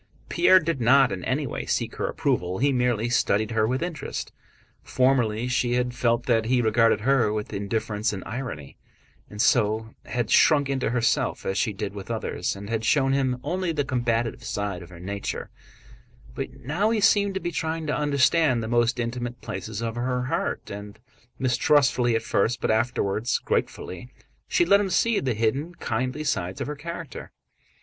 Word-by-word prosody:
Pierre 185 - +6
did 160 -5 -2
not 130 +3 +5
in 90 - -4
any 140 +3 0
way 125 - -5
seek - - -1
her - - -1
approval, 90 +1 -1
he 140 +4 +2
merely 125 -3 +1
studied 110 -2 +1
her 110 -1 +2
with 130 +6 -1
interest. 175 -2 -5 0.5
Formerly 125 -3 +1
she 125 -1 +1
had 125 0 0
felt 120 -1 +1
that 115 -3 +2
he 125 +2 +2
regarded 115 -1 +3
her 120 -3 +3
with 105 -1 -4
indifference 105 +2 -1
and 95 -3 -6
irony, 110 - -6 0.5
and 105 - -10
so 110 +1 +2
had 120 -2 -2
shrunk 145 -3 +5
into 135 -4 0
herself 120 0 0
as 95 - -1
she 105 - +1
did 100 0 -5
with 100 -2 -8
others - - -2
and 100 +1 -8
had 115 0 -2
shown 135 +2 +3
him 130 -2 0
only 180 +3 -1
the 145 -3 -1
combative 120 -2 -1
side 100 -5 -3
of 85 - -11
her 90 -2 -12
nature; 100 +3 -5 0.8
but - - -4
now 170 +10 +1
he 225 -1 +1
seemed 200 -2 +3
to - - 0
be 175 0 -3
trying 160 0 -2
to 150 - -1
understand 145 -2 +2
the - - -3
most 120 0 +1
intimate 120 +1 -3
places 100 +4 -5
of 115 -1 -2
her 125 +1 -1
heart, 125 - -2
and, 100 0 -8 0.4
mistrustfully 125 -2 +3
at 115 - 0
first 115 +2 +1
but - - 0
afterwards 110 -1 0
gratefully, 90 +7 -3 0.4
she 350 - +2
let 200 -10 +5
him 200 - -1
see 220 +4 +2
the 125 -4 -1
hidden, 135 +10 -1
kindly 130 +5 -2
sides 90 -10 -2
of - - -2
her 150 - -4
character. 165 -1 -7
120 Hz, 180 wpm, -25 LUFS, 110-140 Hz, 0.8 s, Pierre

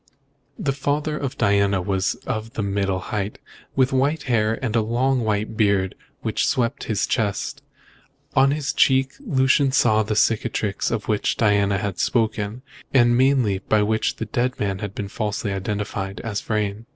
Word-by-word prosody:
The 140 - -1
father 145 +2 -1
of 140 -3 -4
Diana 100 -1 +2
was 95 +1 0
of 115 -2 -4
middle 100 -2 0
height, 100 +2 -4 0.4
with 130 0 +2
white 140 +4 +1
hair, 115 -3 +1
and 115 -2 -2
a 115 - +4
long 125 +4 +1
white 110 -1 -1
beard 100 -3 +2 0.3
which - - 0
swept 125 +2 0
his 110 -3 0
chest. 105 -3 -2 0.7
On 135 +1 +5
his 145 -1 -1
cheek 135 0 +3
Lucian 135 - +2
saw 110 -5 +3
the 105 0 -2
cicatrice 105 -2 +1
of 105 - -3
which 105 -2 0
Diana 100 -2 +3
had 95 -2 -3
spoken, 110 0 0 0.3
and 120 -2 +4
mainly 125 -6 +3
by 105 +2 +2
which 110 +1 0
the 110 - -4
dead 125 +4 -1
man 100 -2 -1
had 100 0 -5
been 100 - -4
falsely 105 0 -3
identified 100 0 -3
as 105 -3 -3
Vrain. 105 +1 -2
110 Hz, 160 wpm, -23 LUFS, 100-130 Hz, 0.7 s, On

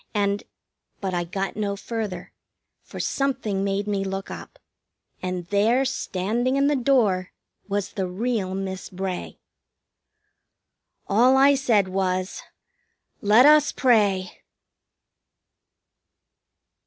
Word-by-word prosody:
And 200 0 +1 0.3
" - - -51
But 190 -2 -3
I 175 -1 -1
got 195 +3 -3
no 205 -1 -2
further, 205 -4 -5 0.5
for - - -10
something 220 -8 -1
made 200 +1 -1
me 200 -2 -1
look 195 0 -5
up, - - -9 0.6
and 180 -1 -3
there, 225 +6 +3
standing 240 +1 -1
in 275 0 +2
the 290 +1 +3
door, 230 -9 +1 0.4
was 200 0 -2
the 190 -2 -2
real 195 0 -2
Miss 190 -1 -5
Bray. 185 -1 -5 1.7
All 245 +6 +4
I 275 +1 +6
said 235 -8 +2
was 185 0 -2 0.8
"Let 215 +4 +6
us 300 0 +6
pray!" 200 -7 +2
200 Hz, 110 wpm, -24 LUFS, 190-245 Hz, 1.7 s, I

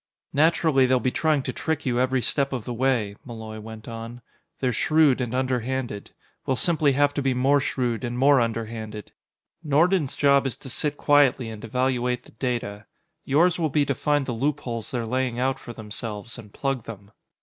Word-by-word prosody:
"Naturally, 155 -3 +3
they'll 130 0 +3
be 130 - 0
trying 155 -2 +1
to - - -4
trick 160 -2 -2
you 125 -2 +1
every 130 0 +1
step 140 -1 +1
of 125 -5 -4
the 120 - -4
way," 120 -5 0
Malloy 110 -2 -8
went 110 0 -10
on. 115 +1 -7 0.4
"They're 125 -2 0
shrewd 150 0 +3
and 120 0 -2
underhanded; 130 -3 -2 0.3
we'll 130 - 0
simply 150 -1 +2
have 145 +1 +3
to 145 - -1
be 135 -2 +1
more 135 +3 +3
shrewd 125 -3 -1
and 120 0 -3
more 135 0 +5
underhanded. 110 -2 -4 0.5
Nordon's 155 +1 +2
job 140 -1 +4
is 130 - -4
to 130 - -10
sit 150 +2 -1
quietly 140 -5 +3
and 110 0 -9
evaluate 125 +1 0
the - - -17
data; 110 -4 -3 0.4
yours 170 +6 +3
will 160 -2 +1
be 145 0 +2
to 140 - 0
find 145 +1 0
the 125 - -3
loopholes 125 -3 -2
they're 120 -3 -2
laying 125 0 -1
out 130 +2 0
for - - -9
themselves 110 0 -6
and 105 -2 -12
plug 135 -2 -2
them. 100 -2 -10
130 Hz, 185 wpm, -25 LUFS, 115-140 Hz, 0.5 s, more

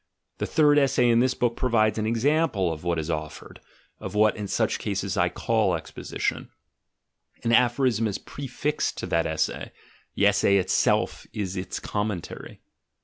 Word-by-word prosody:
The - - -2
third 150 -1 +4
essay 130 -3 +3
in 115 0 +4
this 130 +1 +2
book 120 -1 0
provides 110 -4 +1
an 110 - -1
example 115 - +1
of 75 - -9
what 85 -1 0
is 80 +1 -2
offered, 75 -1 -6 0.4
of 95 +1 -7
what 105 0 +4
in 105 -2 -5
such - - 0
cases - - -2
I - - +2
call - - +1
exposition: - - -4 0.9
an 115 - +1
aphorism 120 -1 +3
is 100 -2 -3
prefixed 145 +2 -3
to - - -4
that 85 0 0
essay, 80 0 -2 0.4
the - - +2
essay 100 - +4
itself 95 - +1
is 95 -3 -3
its 90 -1 -4
commentary. 105 -4 -5
110 Hz, 155 wpm, -25 LUFS, 95-125 Hz, 0.9 s, third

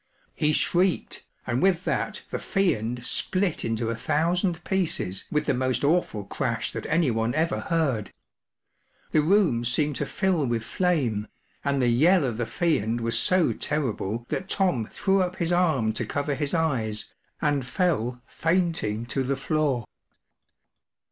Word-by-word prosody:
He 150 - +1
shrieked, 180 +3 0 0.2
and 120 +2 -1
with 185 -2 +2
that - - -2
the - - -2
Fiend 125 - 0
split 185 +3 0
into 115 0 -1
a - - -2
thousand 170 - 0
pieces 170 - -1
with 150 0 +1
the - - +2
most 130 +1 0
awful 145 -9 +1
crash 115 +2 -2
that - - -5
anyone 120 -7 +1
ever 165 +2 +1
heard. 140 - -1 1.0
The 155 - +4
room 165 - +3
seemed 145 +4 +1
to - - -2
fill 185 -8 +1
with 115 -2 -1
flame, 130 - 0 0.4
and 140 -1 +1
the 125 - +2
yell 155 +7 +4
of 120 -4 -2
the 120 -1 -2
Fiend 120 -10 0
was 115 0 +2
so 185 +5 +3
terrible 120 -6 -2
that 190 - -3
Tom 160 - +1
threw 195 -1 +1
up 180 0 -1
his 175 -2 -1
arm 155 -11 +2
to - - -2
cover 145 0 -1
his 145 +3 -2
eyes, 120 -10 -1 0.3
and 145 -2 +1
fell 125 - -1
fainting 165 - 0
to 135 +3 -2
the 135 +1 -1
floor. 135 -4 0
145 Hz, 150 wpm, -26 LUFS, 120-175 Hz, 1.0 s, The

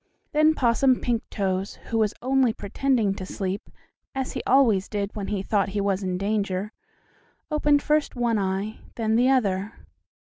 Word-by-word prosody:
Then 310 +1 +4
Possum 255 +1 +3
Pinktoes, 195 -5 -2
who 225 - -3
was 215 -1 +1
only 260 -2 +3
pretending 225 0 0
to 190 - -7
sleep, 190 +1 -4 0.5
as 265 -1 -2
he - - -4
always 230 -8 +4
did 205 -1 -3
when 205 -2 -4
he 200 -2 -2
thought 200 -1 +1
he 205 +1 -2
was 200 -1 0
in 185 -2 -2
danger, 200 0 -1 0.8
opened 295 -1 +3
first 300 -1 +1
one 235 -3 +1
eye, 195 +2 -2 0.2
then 220 -1 0
the 245 +3 +4
other. 205 -5 +1
215 Hz, 160 wpm, -25 LUFS, 195-255 Hz, 0.8 s, Then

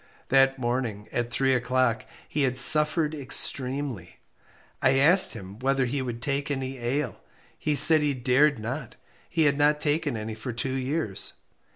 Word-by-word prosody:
That 135 0 +3
morning, 120 -4 -4
at 120 -1 -3
three 130 +2 0
o'clock, 125 -2 -1 0.2
he 150 - -3
had 130 -2 -1
suffered 150 +2 +5
extremely. 135 - -1 0.6
I 135 0 +2
asked 165 +8 +4
him 100 -1 -11
whether 135 0 0
he 135 +3 -3
would 120 -2 -6
take 140 +2 -3
any 135 -2 -5
ale. 125 +1 -3 0.4
He 150 - -1
said 155 +1 +7
he 145 -2 -1
dared 130 +3 +1
not 120 +7 -7 0.3
he 165 -2 0
had 145 -1 +1
not 150 +1 +2
taken 150 -4 -2
any 110 +1 -6
for 115 +3 -7
two 130 +3 -4
years. 130 -5 -3
135 Hz, 160 wpm, -25 LUFS, 120-145 Hz, 0.6 s, said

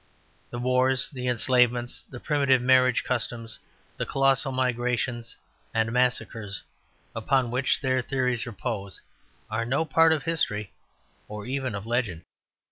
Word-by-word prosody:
The 120 - -6
wars, 130 +1 +3
the 125 -3 -5
enslavements, 125 0 +2
the 125 - -11
primitive 140 -3 +2
marriage 130 0 +4
customs, 115 -2 -3 0.4
the - - -2
colossal 135 0 +2
migrations 125 -2 -1 0.4
and 110 0 +1
massacres 115 -4 -1 0.5
upon 125 +2 +1
which 130 +2 +1
their 130 -1 +1
theories 125 -2 -1
repose, 105 -4 -4 0.5
are 110 +1 0
no 135 +7 0
part 165 +2 +4
of 155 -3 +1
history 105 - -1 0.5
or 105 -1 -7
even 130 -3 -2
of 100 +1 -6
legend. 115 -8 -1
125 Hz, 125 wpm, -26 LUFS, 115-130 Hz, 0.5 s, marriage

